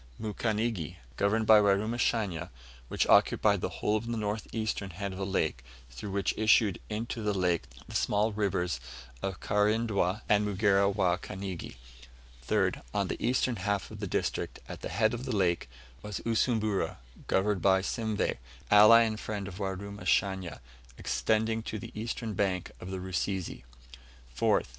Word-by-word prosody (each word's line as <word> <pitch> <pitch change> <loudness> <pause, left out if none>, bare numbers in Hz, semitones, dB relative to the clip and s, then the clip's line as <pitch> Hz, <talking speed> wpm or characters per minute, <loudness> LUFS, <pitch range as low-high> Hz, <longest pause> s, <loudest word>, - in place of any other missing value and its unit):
Mukanigi, 110 -4 -2 0.2
governed 110 - +1
by 110 0 +8
Warumashanya, 100 -3 +1 0.4
which - - 0
occupied - - +4
the - - -1
whole 105 +1 0
of 110 +2 -6
the 120 -1 -2
north 105 0 -2
eastern 110 -3 -2
head 95 +3 -5
of 95 - -7
the 95 - -1
lake, 80 -9 -1 0.3
through - - -7
which 100 0 0
issued 110 -3 +4
into 115 +2 -3
the 105 -1 0
lake 90 -3 +1 0.2
the - - -10
small 105 +2 +2
rivers 90 -8 -1 0.4
of 95 -2 -3
Karindwa 105 -1 +1
and 105 0 +4
Mugera 100 -1 +3
wa 95 -3 +2
Kanigi. 95 -6 -6 0.7
3rd. - - +1
On - - +1
the - - -4
eastern 125 -1 +1
half 100 0 -2
of - - -9
the - - -3
district, - - -2
at - - -8
the - - -4
head 110 +6 +2
of 120 +2 -4
the 130 -5 -2
lake, 85 -8 +1 0.3
was 105 -1 -5
Usumbura, 110 -3 0 0.3
governed 95 -1 +1
by 95 +1 +4
Simveh, 110 - -1 0.3
ally 105 +3 +9
and 110 -2 0
friend 105 -2 -4
of 95 0 -8
Warumashanya, 95 -2 -1 0.4
extending 110 +1 0
to 110 - -5
the 100 - -8
eastern 115 0 -4
bank 95 -3 -1
of 90 - -8
the 95 - -3
Rusizi. 95 -5 -3 0.7
4th. - - +2
105 Hz, 155 wpm, -30 LUFS, 95-110 Hz, 0.7 s, ally